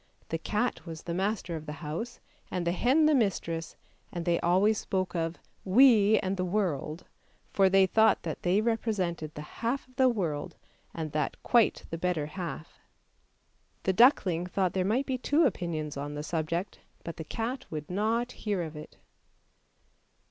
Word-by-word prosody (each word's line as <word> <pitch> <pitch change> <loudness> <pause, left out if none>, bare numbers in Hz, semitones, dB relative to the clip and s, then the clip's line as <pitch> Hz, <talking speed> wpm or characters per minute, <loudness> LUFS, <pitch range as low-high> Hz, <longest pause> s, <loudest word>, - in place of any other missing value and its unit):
The 165 - -2
cat 210 +8 -1
was 160 -1 -7
the 170 - -4
master 190 -1 -1
of 155 -1 -7
the 150 - -4
house 225 +11 -4 0.3
and 180 -2 -2
the 170 - +2
hen 260 - +3
the 305 - +5
mistress, 175 - 0 0.4
and 170 -1 -4
they 170 -1 +2
always 195 +5 +3
spoke 185 -1 -2
of 165 0 -1 0.3
"we 215 0 +6
and 190 0 -2
the 185 - 0
world," 175 -5 -2 0.5
for 195 -1 +5
they 195 0 +5
thought 220 +3 +3
that 160 - -4
they 185 +4 +2
represented 195 -9 -1
the 150 - -6 0.2
half 240 +4 -1
of 255 0 -25
the 260 -1 +5
world, 165 -11 -2 0.4
and 160 -2 -5
that 150 0 -1
quite 235 -3 +3
the 165 - -4
better 175 -4 0
half. 165 0 -7 1.0
The 190 - +2
duckling 185 - +4
thought 185 -1 0
there 185 - +1
might 230 +8 +1
be 260 -2 -2
two 295 +6 +3
opinions 165 - -2
on 145 +1 -5
the 150 - -4
subject, 165 +3 -2 0.2
but 165 - -6
the 160 - -5
cat 230 - -4
would 150 -2 -5
not 225 +6 0
hear 205 -7 -2
of 160 -1 -7
it. 150 0 -10
185 Hz, 170 wpm, -29 LUFS, 165-220 Hz, 1.0 s, we